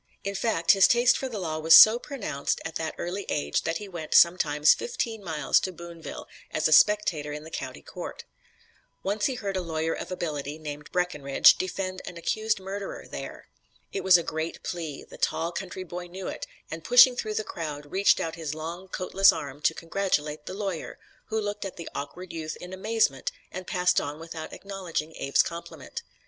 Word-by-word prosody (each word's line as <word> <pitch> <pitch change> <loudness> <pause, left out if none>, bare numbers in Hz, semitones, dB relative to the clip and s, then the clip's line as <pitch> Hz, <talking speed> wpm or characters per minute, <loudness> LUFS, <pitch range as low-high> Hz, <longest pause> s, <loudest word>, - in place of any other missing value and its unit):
In 200 - -2
fact, 195 -4 +2
his 195 -1 +6
taste 240 +1 +5
for 265 - -3
the 225 - -5
law 160 -5 -3
was 160 +1 +7
so 220 +2 +10
pronounced 245 - -3
at 165 - -4
that 160 -1 -4
early 190 +3 -3
age 75 0 0
that 165 +1 0
he 205 - -8
went, 170 -5 -4
sometimes, 150 -4 +6
fifteen 240 - -4
miles 155 -6 +2
to 185 - -3
Boonville, 170 -4 -9 0.2
as 155 - +1
a - - -2
spectator 165 -4 +4
in 150 +1 -6
the 160 - -11
county - - -6
court. - - -8 0.8
Once 205 +2 0
he 265 - -2
heard 200 -5 -4
a 185 - 0
lawyer 160 -1 -2
of - - -6
ability, 150 -5 -3
named 150 -1 -8
Breckinridge, 150 -7 +4
defend 185 0 -3
an 170 - -7
accused 215 +5 0
murderer 195 +1 -6
there. - - -8 0.5
It 400 - -2
was 185 -1 +7
a 170 - -2
great 160 +1 -4
plea; 160 -5 -5
the - - -14
tall 165 +1 0
country 185 +1 -5
boy 175 0 -7
knew 185 +2 -7
it - - -5 0.2
and, 165 0 -6
pushing 245 +3 +8
through 215 -3 -3
the 215 - 0
crowd, 150 -6 -6
reached 195 +1 +4
out 160 - -2
his 160 -2 -5
long, 170 +4 -6
coatless 190 +1 +4
arm 145 0 -6
to - - +3
congratulate 155 -4 -2
the 185 - -5
lawyer, 195 -5 -4 0.3
who 220 - -1
looked 205 -1 -3
at 195 - -6
the 170 - -7
awkward 175 +5 -6
youth 160 -1 -4
in 180 +1 -9
amazement 190 - 0 0.2
and 185 0 -7
passed 180 0 +2
on 145 +1 -5
without 165 -1 -7
acknowledging 180 -5 -5
Abe's 140 - +3
compliment. 170 - -7
175 Hz, 190 wpm, -27 LUFS, 155-195 Hz, 0.8 s, so